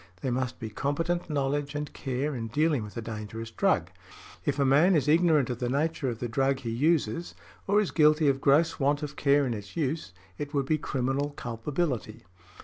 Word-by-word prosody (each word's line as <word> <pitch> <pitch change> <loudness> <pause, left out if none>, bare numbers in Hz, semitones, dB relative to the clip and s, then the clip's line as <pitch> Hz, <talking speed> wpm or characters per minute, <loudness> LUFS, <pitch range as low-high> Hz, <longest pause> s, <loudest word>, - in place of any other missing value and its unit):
There 130 - -1
must 125 0 -2
be 110 -2 -6
competent 165 +9 -1
knowledge 145 0 -1
and 145 0 -4
care 135 +2 -2
in 115 -2 -4
dealing 150 +2 +1
with 105 +2 -8
a 115 - -4
dangerous 110 +1 -6
drug; - - +1 0.5
if 145 -1 -1
a 140 - +2
man 150 +8 +5
is 150 -2 +1
ignorant 155 -4 +4
of 120 - -4
the 125 - -1
nature 145 0 0
of 115 - -4
the 120 - -3
drug 135 +4 +1
he 115 -3 -3
uses, 165 +6 0 0.3
or 205 +1 +4
is 210 - 0
guilty 155 0 +4
of 135 -1 +2
gross 150 +4 +3
want 145 +1 +1
of 145 -1 -5
care 140 0 +3
in 125 - -1
its 105 +2 -8
use, 150 - -2 0.3
it 145 0 -5
would 140 -1 +1
be 155 +2 +1
criminal 135 +1 -1
culpability. 120 - -3
140 Hz, 200 wpm, -28 LUFS, 125-150 Hz, 0.5 s, man